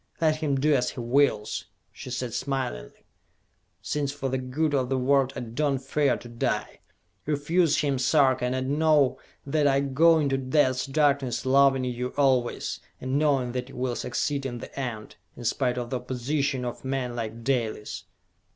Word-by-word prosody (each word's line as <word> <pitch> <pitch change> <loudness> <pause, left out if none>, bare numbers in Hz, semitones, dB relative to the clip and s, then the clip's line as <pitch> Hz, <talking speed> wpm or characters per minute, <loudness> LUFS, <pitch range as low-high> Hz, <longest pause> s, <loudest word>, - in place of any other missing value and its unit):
"Let 155 -2 +2
him 150 -3 0
do 150 +2 +3
as 130 -3 +2
he - - -8
wills," 120 -3 +1 0.3
she - - -9
said 125 -2 -3
smilingly, 120 - -4 0.8
"since 145 -2 -1
for 140 -2 -3
the 130 0 -1
good 145 +4 -1
of 130 -3 +1
the 135 - +1
world 135 0 +2
I - - -4
do 135 +5 -1
not 135 0 -3
fear 145 +1 +1
to - - -11
die! 115 0 -2 0.5
Refuse 155 +2 +2
him, 140 -3 0
Sarka, 130 -1 +3
and 130 +3 -1
know 150 -4 +3 0.3
that 145 +1 +2
I 135 0 +3
go 155 +5 +4
into 140 -3 +1
Death's 130 -1 +1
Darkness 140 -3 +1
loving 135 0 +4
you 125 0 -3
always, 130 -4 +1 0.2
and 130 +2 -1
knowing 135 -5 +2
that 125 +1 -4
you - - -12
will 125 -1 -2
succeed 140 +4 -2
in 125 -3 -4
the - - -10
end, 115 -5 -5 0.2
in 120 - -8
spite 125 +2 0
of 120 -1 -4
the 130 - 0
opposition 130 +1 -2
of 120 - -5
men 130 -2 -2
like 115 0 -5
Dalis!" 115 -5 -2
135 Hz, 175 wpm, -26 LUFS, 125-145 Hz, 0.8 s, go